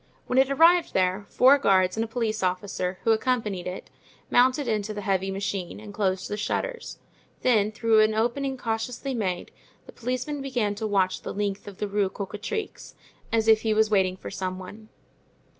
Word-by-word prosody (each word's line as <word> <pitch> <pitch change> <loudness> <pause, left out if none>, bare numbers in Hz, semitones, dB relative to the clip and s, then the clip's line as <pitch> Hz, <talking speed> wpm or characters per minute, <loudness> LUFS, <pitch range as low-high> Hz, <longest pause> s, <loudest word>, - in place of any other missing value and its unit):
When 250 - +2
it 265 0 +4
arrived 330 +5 +4
there, 190 +2 +1
four 270 +3 +5
guards 185 -7 +3
and 220 - 0
a - - -4
police 225 -2 -2
officer, 185 0 -2
who 225 - +3
accompanied 220 -5 0
it, 180 +1 -7 0.4
mounted 255 +2 +3
into 215 -1 -1
the 205 - -4
heavy 195 -1 0
machine 195 -1 -4
and 210 -1 -10
closed 190 -3 -1
the 210 - -4
shutters; - - -3 0.5
then 215 -4 +3
through 225 0 +3
an 215 0 +4
opening 265 +4 0
cautiously 240 +3 -3
made, 190 -7 -2 0.3
the - - -12
policeman 255 +4 -3
began 245 -7 -1
to 215 +2 -3
watch 190 -3 +1
the - - -6
length 205 0 -3
of 200 -2 -9
the 210 - -2
Rue 200 -1 0
Cocatrix, 210 - -6 0.4
as 225 -1 +1
if 220 -1 +6
he 220 -1 +1
was 220 0 +3
waiting 190 -2 +2
for - - -8
some 185 -1 -3
one. 210 +4 -11
215 Hz, 180 wpm, -26 LUFS, 195-245 Hz, 0.5 s, if